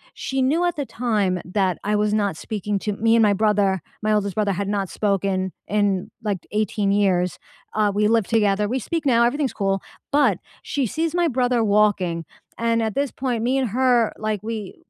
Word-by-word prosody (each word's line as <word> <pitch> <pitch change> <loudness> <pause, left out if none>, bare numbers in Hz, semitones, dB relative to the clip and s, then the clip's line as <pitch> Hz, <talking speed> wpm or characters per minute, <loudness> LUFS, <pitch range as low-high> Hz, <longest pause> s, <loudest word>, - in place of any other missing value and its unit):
she 265 0 -2
knew 295 +7 +2
at 350 - 0
the 285 - -3
time 210 -8 0
that 185 -1 0
I 210 +1 0
was 210 0 +1
not 205 -5 0
speaking 210 -1 -3
to 210 +1 -2
me 225 +3 +2
and 225 - +5
my 205 - +4
brother- 200 -3 +2 0.2
my 215 0 +1
oldest 200 -2 0
brother- 210 -2 +1
had 200 +2 -3
not 200 -2 -1
spoken 195 -2 0 0.2
in, 205 -3 0
like, 205 -3 -1
18 210 -1 0
years, 185 -3 +1 0.3
uh, 210 -1 +2
we 210 +1 +2
live 225 -2 +2
together, 210 -2 +2
we 255 +4 -1
speak 325 +6 -3
now, 235 -3 +4
everything's 270 +2 0
cool, 195 -2 -1 0.3
but, 270 -10 +3 0.2
she 280 -2 -1
sees 320 - -2
my 345 -1 +3
brother 245 -4 +1
walking, 200 -5 +2 0.3
and 230 0 +1
at 220 -2 -2
this 280 -1 0
point, 245 -4 -2
me 255 +3 +1
and 260 -3 0
her, 245 0 +2
like, 215 -2 -2
we 215 -3 -5
210 Hz, 195 wpm, -22 LUFS, 200-240 Hz, 0.3 s, and